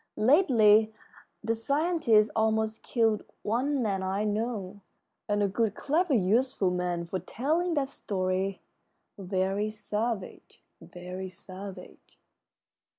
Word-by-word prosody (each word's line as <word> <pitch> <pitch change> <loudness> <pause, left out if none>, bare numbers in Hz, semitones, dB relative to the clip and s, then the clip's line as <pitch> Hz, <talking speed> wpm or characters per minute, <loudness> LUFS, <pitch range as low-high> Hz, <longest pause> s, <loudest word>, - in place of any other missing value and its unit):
Lately 220 - +5 0.5
the 225 +1 +1
scientists 275 -3 +2
almost 220 0 +1
killed 225 -3 +1 0.2
one 255 +5 0
man 195 -3 -1
I 190 +2 -1
know, 210 -2 -3 0.5
and 205 0 +2
a - - +3
good, 210 +1 0
clever, 315 0 +1
useful 215 0 +2
man, 180 -1 -2
for 185 +2 -3
telling 315 - -1
that 280 -2 +1
story 190 -4 -2 0.6
very 195 +2 -1
savage, 215 0 -4 0.2
very 180 +1 -7
savage." 185 +2 -11
215 Hz, 105 wpm, -28 LUFS, 190-240 Hz, 0.6 s, Lately